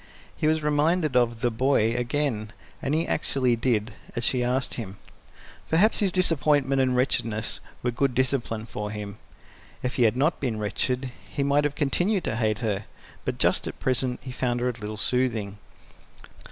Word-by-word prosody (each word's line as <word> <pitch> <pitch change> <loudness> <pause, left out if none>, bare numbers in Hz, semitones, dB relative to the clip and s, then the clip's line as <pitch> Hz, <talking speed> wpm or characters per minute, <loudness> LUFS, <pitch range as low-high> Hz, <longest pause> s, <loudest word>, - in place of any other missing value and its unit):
He 155 - 0
was 155 0 +2
reminded 150 0 +2
of 120 -2 +2
"the 120 - +2
boy" 115 -1 +2
again, 120 -3 -1 0.3
and 145 -1 0
he 165 - +1
actually 130 -5 +1
did 115 -2 0 0.2
as 120 - -2
she 125 +1 +1
asked 125 +1 0
him. 100 -5 -6 0.7
Perhaps 190 +8 +4
his 200 -4 +2
disappointment 145 -6 +2
and 130 -1 +2
wretchedness 115 -4 0 0.2
were 125 - +1
good 125 +1 0
discipline 120 -4 0
for 105 -2 -5
him; 105 -1 -6 0.6
if 125 -1 -2
he 125 - +4
had 110 +2 +2
not 150 +5 +2
been 120 -6 -1
wretched 125 +5 -1 0.2
he 140 - -1
might 140 +1 +3
have 145 0 -1
continued 175 +7 +1
to - - -1
hate 110 -3 +1
her, 100 -1 -1 0.4
but - - -2
just - - +2
at - - -6
present 125 -1 0
he 130 - -6
found 125 -1 -1
her 125 +1 +1
a - - +1
little 110 -2 -6
soothing. 110 -3 0
125 Hz, 175 wpm, -26 LUFS, 115-140 Hz, 0.7 s, Perhaps